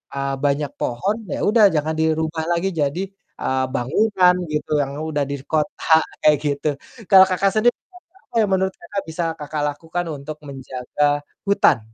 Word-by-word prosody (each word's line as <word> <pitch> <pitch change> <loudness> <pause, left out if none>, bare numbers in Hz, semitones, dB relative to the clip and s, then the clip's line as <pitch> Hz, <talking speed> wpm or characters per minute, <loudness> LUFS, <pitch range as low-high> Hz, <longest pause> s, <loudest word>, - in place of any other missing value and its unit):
ah, 140 0 -1
banyak 145 0 0
pohon 160 - -1
ya - - -3
udah 215 0 +5
jangan 155 +1 0
dirubah 160 0 0
lagi 170 +3 +1
jadi, 150 0 -1 0.4
eee, 130 0 0
bangunan 180 - +3 0.2
gitu 150 - -3
yang 140 0 -3
udah 150 -2 -1
di 140 - -3
kota 160 +1 +2 0.3
kayak 150 -1 +6
gitu. 145 +1 -1 0.4
Kalau 190 -1 +9
Kakak 195 +1 +2
sendiri, 235 +3 +3 0.4
apa 385 -8 -27
yang 205 - 0
menurut 190 0 +1
Kakak 195 +3 -5
bisa 160 +2 -3 0.2
Kakak 150 0 -4
lakukan 165 +4 -4
untuk 150 +2 -7
menjaga 140 +2 -2 0.3
hutan? 200 - +4
155 Hz, 155 wpm, -21 LUFS, 145-185 Hz, 0.4 s, Kalau